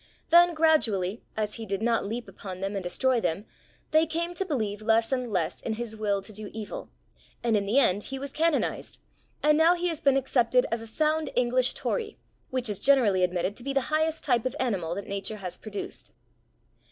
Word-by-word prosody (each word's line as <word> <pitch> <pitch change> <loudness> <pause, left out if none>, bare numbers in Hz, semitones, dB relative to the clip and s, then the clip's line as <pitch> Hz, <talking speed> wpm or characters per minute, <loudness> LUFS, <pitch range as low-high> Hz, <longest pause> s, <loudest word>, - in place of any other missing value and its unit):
Then, 345 0 +7
gradually, 230 - +2 0.2
as 210 -1 -1
he 225 - -5
did 195 +2 -2
not 235 -1 +2
leap 235 +3 -4
upon 185 -3 -8
them 195 +2 -3
and 195 - -2
destroy 240 +7 +1
them, 195 +4 -1 0.5
they 315 +1 +4
came 340 +2 -2
to 370 - -1
believe 215 - -2
less 225 +2 +2
and 250 -3 -1
less 175 -4 -1
in 225 - -2
his 225 0 -5
will 205 -2 -1
to 215 - -8
do 210 0 -7
evil, 220 -2 -6 0.5
and 230 -2 +2
in 200 -1 0
the 225 +7 +1
end 205 -7 +3
he 270 - -5
was 275 +1 -6
canonised, 325 -1 0 0.5
and 300 0 +5
now 335 +2 +6
he 355 0 -1
has 325 -3 -4
been 275 -1 +4
accepted 250 -2 +2
as 230 0 -1
a 225 - -8
sound 310 +6 0
English 250 +1 +3
Tory, 445 -3 -3 0.3
which 255 -2 -1
is 205 -3 -2
generally 230 -10 +4
admitted 180 +2 0
to 240 - -5
be 275 +1 -2
the 275 +2 -1
highest 315 +1 +1
type 245 -3 +2
of 255 - -5
animal 185 -10 -1
that 200 - -5
Nature 200 +2 -4
has 185 -3 -6
produced. 210 -2 -7
235 Hz, 205 wpm, -27 LUFS, 205-280 Hz, 0.5 s, Then